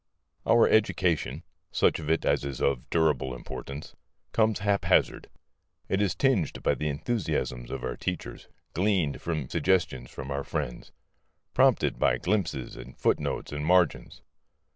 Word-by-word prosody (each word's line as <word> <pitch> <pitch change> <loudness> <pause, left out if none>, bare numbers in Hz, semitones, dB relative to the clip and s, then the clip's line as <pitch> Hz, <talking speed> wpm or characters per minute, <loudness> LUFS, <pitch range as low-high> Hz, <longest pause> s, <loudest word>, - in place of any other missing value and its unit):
Our 115 0 +6
education 95 -6 +1 0.3
such - - +2
of 75 -1 -5
it 80 0 +1
as - - +2
is 70 -2 -4
of 65 -3 0
durable 75 -6 +1
importance 70 +3 -8 0.4
comes 110 -2 +2
haphazard. 100 0 +2 0.6
It 95 - +1
is 100 -3 +1
tinged 120 - +1
by - - +3
the 75 - -2
enthusiasms 75 - -2
of 65 -1 -5
our 65 -1 -3
teachers, 90 -9 -5 0.3
gleaned 90 -6 +1
by 80 -5 -2
suggestions 65 -11 0
from 65 +1 -7
our 70 0 -2
friends, 70 -6 -4 0.6
prompted - - +3
by - - +3
glimpses 85 - -1
and - - -11
footnotes - - 0
and 75 0 -4
margins. 90 +1 +2
80 Hz, 140 wpm, -28 LUFS, 70-95 Hz, 0.6 s, Our